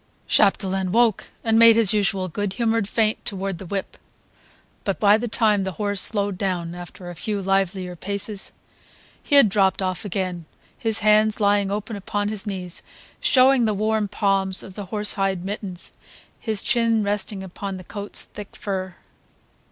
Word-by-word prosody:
Chapdelaine 190 Hz, -1 st, +2 dB
woke 230 Hz, -1 st, +2 dB, 0.2 s
and 225 Hz, -1 st, +3 dB
made 230 Hz, -1 st, +8 dB
his 225 Hz, -3 st, +5 dB
usual 195 Hz, -2 st, 0 dB
good 190 Hz, +3 st, -3 dB
humoured 225 Hz, -3 st, 0 dB
feint 220 Hz, -1 st, 0 dB
toward 195 Hz, -3 st, -4 dB
the 190 Hz, -, -9 dB
whip; 195 Hz, +1 st, -4 dB, 0.9 s
but 195 Hz, -, -2 dB
by 205 Hz, 0 st, +6 dB
the 230 Hz, +2 st, -2 dB
time 215 Hz, -3 st, +2 dB
the 190 Hz, -1 st, -4 dB
horse 205 Hz, 0 st, -1 dB
slowed 200 Hz, -3 st, +3 dB
down, 175 Hz, -3 st, -2 dB
after 175 Hz, 0 st, -9 dB
a -, -, -10 dB
few 205 Hz, +7 st, -3 dB
livelier 190 Hz, -1 st, -1 dB
paces, 200 Hz, +3 st, -3 dB, 0.7 s
he 290 Hz, -, +1 dB
had 280 Hz, -5 st, +8 dB
dropped 195 Hz, -1 st, +2 dB
off 185 Hz, -2 st, -2 dB
again, 185 Hz, -4 st, -3 dB, 0.3 s
his 225 Hz, -1 st, 0 dB
hands 215 Hz, 0 st, +4 dB
lying 200 Hz, -1 st, +2 dB
open 210 Hz, +2 st, -4 dB
upon 205 Hz, +1 st, -2 dB
his 215 Hz, 0 st, -5 dB
knees 185 Hz, -3 st, -3 dB, 0.4 s
showing 260 Hz, -1 st, +4 dB
the 215 Hz, -1 st, 0 dB
worn 215 Hz, +1 st, 0 dB
palms 195 Hz, -1 st, 0 dB
of 190 Hz, -, -10 dB
the 205 Hz, +1 st, -6 dB
horse 210 Hz, +2 st, +1 dB
hide 195 Hz, -3 st, -1 dB
mittens, 195 Hz, -3 st, -6 dB, 0.5 s
his 220 Hz, -3 st, -1 dB
chin 230 Hz, -3 st, +2 dB
resting 205 Hz, -1 st, -2 dB
upon 190 Hz, +1 st, -6 dB
the 185 Hz, -, -10 dB
coat's 205 Hz, +3 st, -2 dB
thick 205 Hz, -1 st, -11 dB
fur. 190 Hz, -2 st, -4 dB
200 Hz, 165 wpm, -23 LUFS, 190-215 Hz, 0.9 s, made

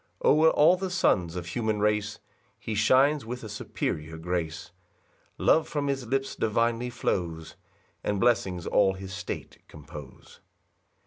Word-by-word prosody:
2 -, -, +2 dB
O'er 155 Hz, +2 st, +6 dB
all 160 Hz, +3 st, +5 dB
the 190 Hz, 0 st, -3 dB
sons 90 Hz, -, +1 dB
of 90 Hz, -1 st, -4 dB
human 110 Hz, +2 st, -1 dB
race 105 Hz, 0 st, 0 dB, 0.4 s
He 110 Hz, -, -5 dB
shines 130 Hz, +7 st, +4 dB
with 125 Hz, +2 st, -6 dB
a -, -, -6 dB
superior 80 Hz, -6 st, -4 dB
grace, 80 Hz, -1 st, -3 dB, 0.7 s
Love 160 Hz, -, +3 dB
from 145 Hz, -2 st, -2 dB
his 135 Hz, -3 st, -2 dB
lips 135 Hz, +2 st, -1 dB
divinely 115 Hz, +2 st, 0 dB
flows, 85 Hz, -9 st, -3 dB, 0.5 s
And 105 Hz, -1 st, -1 dB
blessings 95 Hz, -7 st, +1 dB
all 95 Hz, -2 st, +3 dB
his 95 Hz, 0 st, -8 dB
state -, -, -6 dB
compose. 75 Hz, -3 st, -12 dB
105 Hz, 140 wpm, -27 LUFS, 90-130 Hz, 0.7 s, O'er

